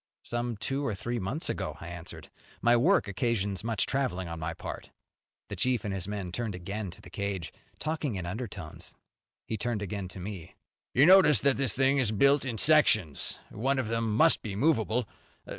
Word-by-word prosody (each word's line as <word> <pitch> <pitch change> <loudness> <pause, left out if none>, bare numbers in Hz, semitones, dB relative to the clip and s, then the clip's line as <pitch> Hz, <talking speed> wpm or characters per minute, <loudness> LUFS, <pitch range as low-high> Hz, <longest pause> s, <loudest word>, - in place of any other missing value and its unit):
"Some 120 -1 -3
two 135 +7 -2
or 115 -7 -1
three 120 +5 -3
months 110 - -3
ago", - - -3
I 85 - -8
answered. 85 0 -9 0.3
"My 120 0 +4
work 165 - +3
occasions 100 -2 -1
much 115 -3 +1
traveling 120 -10 -1
on 85 0 -6
my 80 - -4
part." - - -7 0.6
The - - -6
chief 125 -4 +1
and 100 - -2
his 95 -1 -3
men 100 -3 -4
turned 110 0 -3
again 100 +3 -5
to 95 - -11
the 90 -4 -14
cage, 100 -4 -4 0.2
talking 155 -6 -2
in 90 -2 -4
undertones. 95 -4 -7 0.5
He 110 - -3
turned 115 -1 -2
again 100 -1 -4
to 90 - -8
me. 95 -3 -7 0.4
"You 135 +4 +7
notice 175 - +7
that 140 -1 +3
this 135 -3 +2
thing 135 +1 +3
is 120 -5 +2
built 140 +6 +4
in 120 -3 -3
sections. 110 - +3
One 135 +5 0
of 130 -4 -1
them 115 -2 0
must 165 +5 +6
be 105 -5 -5
movable. 115 -2 +1
110 Hz, 190 wpm, -29 LUFS, 95-130 Hz, 0.6 s, You